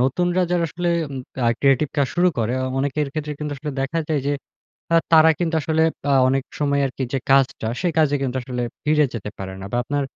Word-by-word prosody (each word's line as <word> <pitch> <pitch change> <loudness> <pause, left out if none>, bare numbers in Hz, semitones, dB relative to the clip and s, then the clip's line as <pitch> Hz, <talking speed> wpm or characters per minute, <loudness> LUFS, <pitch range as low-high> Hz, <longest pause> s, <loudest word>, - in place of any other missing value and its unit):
নতুনরা 175 +8 +1
যারা 175 -1 +2
আসলে 175 +2 -2 0.2
উম 135 - -5 0.3
আর 115 - +4
ক্রিয়েটিভ 135 +1 +3
কাজ 140 -2 +3
শুরু 180 +1 +4
করে, 115 +1 0
অ - - -1
অনেকের 145 +2 0
ক্ষেত্রে 150 -1 -3
কিন্তু 150 -1 -4
আসলে 150 +1 -5
দেখা 135 +5 -1
যায় 150 -3 +1
যে 145 - +1 0.6
আ - - +7 0.2
তারা 160 0 +8
কিন্তু 170 -2 -1
আসলে 160 +1 +1 0.3
আ - - +4 0.2
অনেক 135 +1 +1 0.2
সময় 140 -1 +2
আরকি 130 0 -5
যে 135 - +1
কাজটা, 135 -4 +3
সে 180 - +1
কাজে 150 -2 +3
কিন্তু 130 -1 -2
আসলে 125 -1 -4 0.2
ফিরে 150 0 +4
যেতে 105 -2 -5
পারে 95 0 -5
না। - - -7
বা - - 0
আপনার 145 +2 -1
145 Hz, 220 wpm, -22 LUFS, 135-160 Hz, 0.6 s, তারা